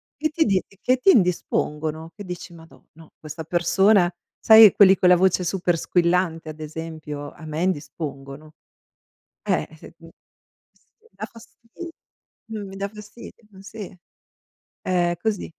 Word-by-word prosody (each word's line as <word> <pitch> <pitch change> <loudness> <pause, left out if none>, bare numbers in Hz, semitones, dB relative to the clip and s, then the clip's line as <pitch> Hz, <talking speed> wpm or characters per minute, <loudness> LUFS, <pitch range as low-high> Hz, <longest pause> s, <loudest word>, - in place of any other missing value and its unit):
che 310 +3 -1
ti 320 +1 +1
di 195 -3 +2 0.2
che 255 +1 +2
ti 320 - +2
indispongono, 160 - -1
che 205 - -9
dici: 180 -1 -8
"Madò, 165 0 -17
no, 160 0 -18
questa 155 +1 -8
persona" 180 +3 +3 0.3
sai 220 -2 +8
quelli 195 -2 +7
con 180 -1 +3
la 180 - +7
voce 185 0 +2
super 175 -1 0
squillante, 170 -2 0
ad 155 - -10
esempio, 155 -2 -7
a 160 - -13
me 155 +2 -3
indispongono. 150 -3 -5 0.9
Eh, - - -1
se - - -15
mi - - -15 0.9
mi 460 0 -27
da - - -7
fasti 230 0 -17 0.9
mi 205 -3 -7
dà 200 - -3
fastidio, 210 +3 -13 0.2
sì, 200 -2 -10 0.8
è 175 -2 0
così. 220 -3 -1
180 Hz, 140 wpm, -23 LUFS, 160-200 Hz, 0.9 s, sai